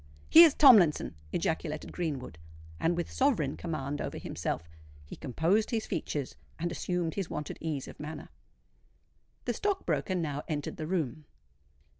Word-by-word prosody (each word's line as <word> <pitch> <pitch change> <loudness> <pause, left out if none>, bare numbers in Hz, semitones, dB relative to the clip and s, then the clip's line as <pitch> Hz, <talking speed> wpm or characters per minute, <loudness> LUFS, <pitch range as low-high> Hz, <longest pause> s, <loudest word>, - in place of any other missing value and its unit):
"Here's 325 -2 +9
Tomlinson!" 205 - +6 0.2
ejaculated 160 -2 -2
Greenwood; 140 - -4 0.4
and 170 +1 +1
with 175 - -3
sovereign 225 - +1
command 145 -4 -4
over - - -4
himself, 85 - -4 0.4
he - - -9
composed 170 - +1
his 225 -3 -1
features 145 -3 -3 0.2
and 175 +1 -2
assumed 175 -1 -2
his 195 -4 -3
wonted 150 - -5
ease 155 -4 -3
of - - -11
manner. 150 +1 -7 1.2
The - - 0
stock 405 -2 -1
broker 190 - 0
now 150 -5 -2
entered 145 -2 -3
the 155 - -4
room. 155 -5 -2
160 Hz, 140 wpm, -30 LUFS, 150-185 Hz, 1.2 s, Here's